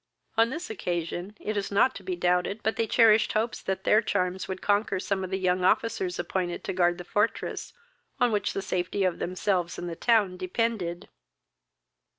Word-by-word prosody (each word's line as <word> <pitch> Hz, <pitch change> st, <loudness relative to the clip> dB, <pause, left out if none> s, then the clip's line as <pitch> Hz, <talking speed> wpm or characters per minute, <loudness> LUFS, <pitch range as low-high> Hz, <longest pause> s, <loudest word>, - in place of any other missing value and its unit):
On 230 Hz, +1 st, +4 dB
this 310 Hz, 0 st, -5 dB
occasion, 175 Hz, +1 st, -3 dB
it 215 Hz, -, -3 dB
is 200 Hz, -1 st, -2 dB
not 230 Hz, +6 st, +4 dB
to -, -, -9 dB
be 185 Hz, -1 st, -3 dB
doubted 180 Hz, +4 st, 0 dB
but 220 Hz, -, +1 dB
they 225 Hz, -, 0 dB
cherished 220 Hz, -1 st, +5 dB
hopes 225 Hz, +2 st, -1 dB
that 190 Hz, 0 st, -3 dB
their 215 Hz, -, +5 dB
charms 185 Hz, -3 st, -1 dB
would 190 Hz, -1 st, -4 dB
conquer 205 Hz, -1 st, +1 dB
some 195 Hz, 0 st, -1 dB
of 185 Hz, -, -4 dB
the 190 Hz, -, -1 dB
young 185 Hz, -1 st, +1 dB
officers 190 Hz, -2 st, +1 dB
appointed 175 Hz, 0 st, -2 dB
to -, -, -3 dB
guard 175 Hz, -1 st, +2 dB
the 180 Hz, -, -7 dB
fortress, 205 Hz, +5 st, -1 dB, 0.5 s
on 245 Hz, -2 st, +3 dB
which 210 Hz, -1 st, 0 dB
the 195 Hz, -, -3 dB
safety 185 Hz, +2 st, -1 dB
of 185 Hz, -2 st, 0 dB
themselves 180 Hz, -1 st, -1 dB
and 175 Hz, -, -5 dB
the 170 Hz, -, -4 dB
town 205 Hz, -3 st, +2 dB
depended. 185 Hz, -2 st, -2 dB
190 Hz, 185 wpm, -27 LUFS, 180-215 Hz, 0.5 s, cherished